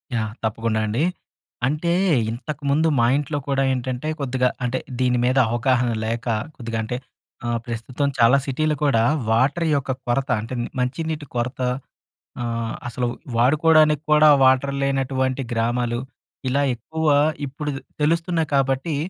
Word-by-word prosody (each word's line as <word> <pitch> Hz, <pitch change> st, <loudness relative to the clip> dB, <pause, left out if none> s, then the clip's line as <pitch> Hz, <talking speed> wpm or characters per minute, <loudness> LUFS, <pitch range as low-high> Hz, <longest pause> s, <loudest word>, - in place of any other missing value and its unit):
Yeah! 110 Hz, -1 st, -2 dB
తప్పకుండా 110 Hz, 0 st, 0 dB
అండి. 120 Hz, +9 st, 0 dB, 0.6 s
అంటే, 155 Hz, +5 st, 0 dB, 0.4 s
ఇంతకుముందు 145 Hz, +4 st, -1 dB
మా 115 Hz, -, +4 dB
ఇంట్లో 145 Hz, 0 st, -2 dB
కూడా 135 Hz, -1 st, +1 dB
ఏంటంటే, 130 Hz, +3 st, -3 dB
కొద్దిగా 130 Hz, -2 st, +1 dB
అంటే, 125 Hz, +1 st, 0 dB, 0.2 s
దీని 125 Hz, -1 st, +2 dB
మీద 130 Hz, +2 st, +2 dB
అవగాహన 120 Hz, 0 st, +1 dB
లేక 115 Hz, +2 st, -3 dB, 0.3 s
కొద్దిగా 115 Hz, -2 st, -4 dB
అంటే, 125 Hz, +3 st, -3 dB, 0.5 s
ఆహ్, 120 Hz, 0 st, 0 dB
ప్రస్తుతం 120 Hz, +4 st, -2 dB
చాలా 120 Hz, +3 st, +6 dB
సిటీలో 150 Hz, +3 st, 0 dB
కూడా 115 Hz, -6 st, +3 dB, 0.3 s
వాటర్ 135 Hz, +9 st, +2 dB
యొక్క 140 Hz, -1 st, -2 dB, 0.2 s
కొరత 135 Hz, +3 st, 0 dB
అంటే, 115 Hz, +3 st, -7 dB
ని -, -, -4 dB
మంచినీటి 155 Hz, +4 st, -2 dB
కొరత 120 Hz, +2 st, -2 dB, 0.8 s
ఆహ్, 115 Hz, -1 st, -3 dB
అసలు 120 Hz, +1 st, -2 dB, 0.3 s
వాడుకోవడానికి 150 Hz, +3 st, +4 dB
కూడా, 150 Hz, 0 st, +7 dB, 0.2 s
వాటర్ 130 Hz, +1 st, +3 dB
లేనటువంటి 135 Hz, -1 st, 0 dB
గ్రామాలు. 120 Hz, +1 st, 0 dB, 0.5 s
ఇలా 140 Hz, +3 st, +1 dB
ఎక్కువ 160 Hz, +6 st, -5 dB, 0.4 s
ఇప్పుడు 145 Hz, +2 st, -4 dB
తే -, -, -8 dB, 0.2 s
తెలుస్తున్నాయి 165 Hz, +1 st, +1 dB
కాబట్టి. 135 Hz, +3 st, +1 dB
130 Hz, 130 wpm, -22 LUFS, 120-145 Hz, 0.8 s, కూడా